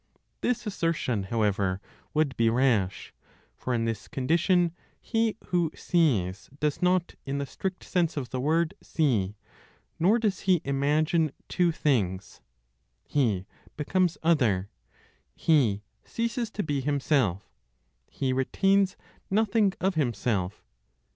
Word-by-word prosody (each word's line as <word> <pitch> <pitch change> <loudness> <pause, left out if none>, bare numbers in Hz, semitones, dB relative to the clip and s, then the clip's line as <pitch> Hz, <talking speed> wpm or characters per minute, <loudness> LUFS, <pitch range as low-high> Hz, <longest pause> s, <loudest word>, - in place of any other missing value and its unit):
This 245 -1 0
assertion, 165 - -1
however, 100 -3 0 0.4
would 150 -4 +2
be 115 -1 +3
rash, 115 -6 +1 0.4
for 130 - -4
in 115 -2 +1
this 115 -2 -3
condition 170 +5 +2 0.3
he 225 -2 0
who 175 -3 +2
sees 105 - +1
does 150 +2 0
not, 180 -1 +2
in 140 0 -3
the 140 - -2
strict 185 +6 -5
sense 170 -4 0
of 130 -4 -4
the 130 - -2
word, 160 +3 +1
see; 110 - 0 0.6
nor 195 +8 +4
does 210 -5 0
he 180 -2 +5
imagine 150 +3 +1 0.2
two 175 -2 +2
things. 100 - -1 0.6
He 110 -10 0 0.3
becomes 175 +3 +1
other, 115 - +2 0.6
he 120 -11 +2 0.2
ceases 235 0 -2
to 210 -1 -3
be 145 -3 -1
himself, 135 - +1 0.6
he 130 -1 -1
retains 195 +9 +2 0.3
nothing 210 0 +3
of 190 +1 +1
himself. 110 - -1
145 Hz, 120 wpm, -27 LUFS, 115-180 Hz, 0.6 s, he